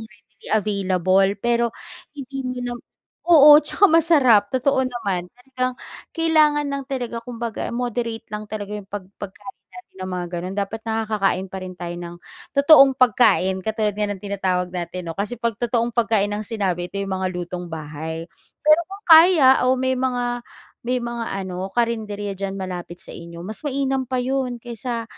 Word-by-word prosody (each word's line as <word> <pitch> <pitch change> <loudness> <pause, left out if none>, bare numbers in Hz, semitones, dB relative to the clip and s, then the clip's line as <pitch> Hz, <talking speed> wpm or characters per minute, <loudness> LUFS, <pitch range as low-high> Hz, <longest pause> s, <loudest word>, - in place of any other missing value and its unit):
yung 225 - -8
ready 210 0 -18
available, 195 -2 +2
pero 235 0 +1 0.5
hindi 270 -1 -6
mo 255 - -2
nam 245 0 -4 0.5
oo, 295 -3 +9
'tsaka 405 +6 +4
masarap 295 -10 +5
totoo 260 +1 +2
naman 205 -8 -3
talagang 255 0 -4 0.4
kailangan 310 -3 +3
lang 280 -1 -3
talaga, 245 -3 -4
kumbaga, 235 -2 -5
moderate 235 -2 -3
lang 210 0 -4
talaga 210 -1 -5
yung 200 -2 -10
pag 205 -2 -6 0.2
pagkain 205 +6 -9
natin 365 - -15
ng 185 - -5
mga 180 -1 -3
gano'n, 180 +2 -4
dapat 205 +2 -3
nakakakain 215 -4 -1
pa 190 +1 -7
rin 185 0 -7
tayo 175 -1 -5
ng 175 0 -8 0.4
totoong 280 -1 +7
pagkain, 205 -6 +3
katulad 215 -1 -1
nga 210 0 -1
ng 195 -1 -6
tinatawag 185 -3 -1
natin, 180 +1 -4
'no, - - -6
kasi 210 +4 -2
pag 235 -2 -1
totoong 235 0 0
pagkain, 215 -3 +1
ang 210 - -3
sinabi 185 -5 -2
ito 200 - -8
yung 195 -1 -2
mga 185 - 0
lutong-bahay. 160 -2 -6 0.4
Pero 305 +2 +6
kung 395 +2 -11
kaya 320 -6 +7
o 260 - +3
may 260 0 0
mga 245 -2 -1 0.4
may 250 +1 0
mga 235 -1 -4 0.2
ano 185 +1 -5
karinderya 215 -4 -1
diyan 195 0 -4
malapit 180 -2 -6
sa - - -8
inyo, 170 0 -10
mas 215 - -4
mainam 270 -2 -1
pa 260 - -1
’yon 255 -1 -1
kaysa 235 0 -5
225 Hz, 165 wpm, -22 LUFS, 190-255 Hz, 0.5 s, oo